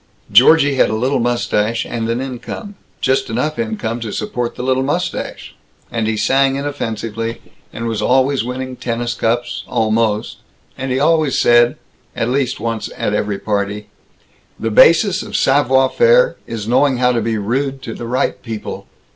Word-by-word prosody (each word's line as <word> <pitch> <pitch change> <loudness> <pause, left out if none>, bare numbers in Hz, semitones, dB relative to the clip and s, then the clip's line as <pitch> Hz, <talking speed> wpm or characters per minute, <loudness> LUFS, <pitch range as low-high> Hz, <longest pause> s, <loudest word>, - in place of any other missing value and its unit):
Georgie 140 +6 +6
had - - +4
a 110 - -1
little 130 +5 0
mustache 115 -2 0
and 115 -1 -3
an 115 +2 -1
income, 135 - -6 0.3
just 130 -1 +1
enough 140 +7 -2
income 110 +1 -2
to 115 -2 -5
support 120 +3 -3
the - - -5
little 130 0 +1
mustache, 170 +7 -3 0.4
and 115 -2 -1
he 110 -1 -1
sang 135 +3 +2
inoffensively, 115 -5 -4 0.3
and 115 - -6
was 110 -2 -2
always 130 +3 +2
winning 130 +1 -5
tennis 120 -1 -3
cups 120 +2 -1
almost 110 -1 0 0.4
and 130 0 -4
he 130 - +1
always 155 -2 +2
said, 120 0 +4 0.4
at 115 - -1
least 130 -1 0
once 115 -2 -3
at 105 - -1
every 105 -1 -1
party, 105 0 -3 0.7
"The 115 0 -2
basis 170 - +5
of - - -7
savoir 135 -1 +3
faire - - +4
is 110 -2 -5
knowing 130 +2 +3
how 125 0 +3
to 120 -2 0
be 110 0 -1
rude 135 +6 -2
to 115 - -5
the 120 - -7
right 125 +2 -1
people." 110 -3 -6
120 Hz, 165 wpm, -17 LUFS, 115-135 Hz, 0.7 s, Georgie